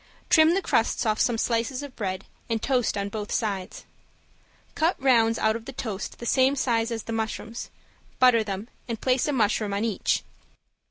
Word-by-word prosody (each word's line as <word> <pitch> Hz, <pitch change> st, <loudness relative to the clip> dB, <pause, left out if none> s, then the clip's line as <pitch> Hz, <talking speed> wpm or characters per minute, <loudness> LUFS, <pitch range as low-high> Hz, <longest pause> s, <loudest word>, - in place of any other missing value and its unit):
Trim 320 Hz, +1 st, +6 dB
the 390 Hz, -, 0 dB
crusts 225 Hz, -, +1 dB
off 215 Hz, -1 st, +1 dB
some 240 Hz, -2 st, +2 dB
slices 235 Hz, +4 st, -1 dB
of 280 Hz, -3 st, -9 dB
bread 190 Hz, -3 st, -3 dB, 0.2 s
and 225 Hz, -1 st, 0 dB
toast 250 Hz, -4 st, 0 dB
on 200 Hz, 0 st, -2 dB
both 210 Hz, 0 st, -5 dB
sides. 195 Hz, -5 st, -3 dB, 0.9 s
Cut 330 Hz, +3 st, +1 dB
rounds 230 Hz, -4 st, +4 dB
out 220 Hz, 0 st, +2 dB
of 230 Hz, -1 st, -6 dB
the 270 Hz, -, -6 dB
toast 215 Hz, -6 st, -5 dB
the 235 Hz, -, -8 dB
same 260 Hz, +3 st, +3 dB
size 230 Hz, -4 st, +1 dB
as 225 Hz, -2 st, -4 dB
the 230 Hz, -, -5 dB
mushrooms, 225 Hz, +1 st, -4 dB, 0.5 s
butter 250 Hz, -3 st, +5 dB
them 200 Hz, +1 st, -5 dB, 0.2 s
and 230 Hz, -2 st, -4 dB
place 255 Hz, +2 st, +1 dB
a -, -, +1 dB
mushroom 215 Hz, -4 st, +1 dB
on 205 Hz, +3 st, 0 dB
each. 220 Hz, -4 st, 0 dB
230 Hz, 180 wpm, -26 LUFS, 215-255 Hz, 0.9 s, Trim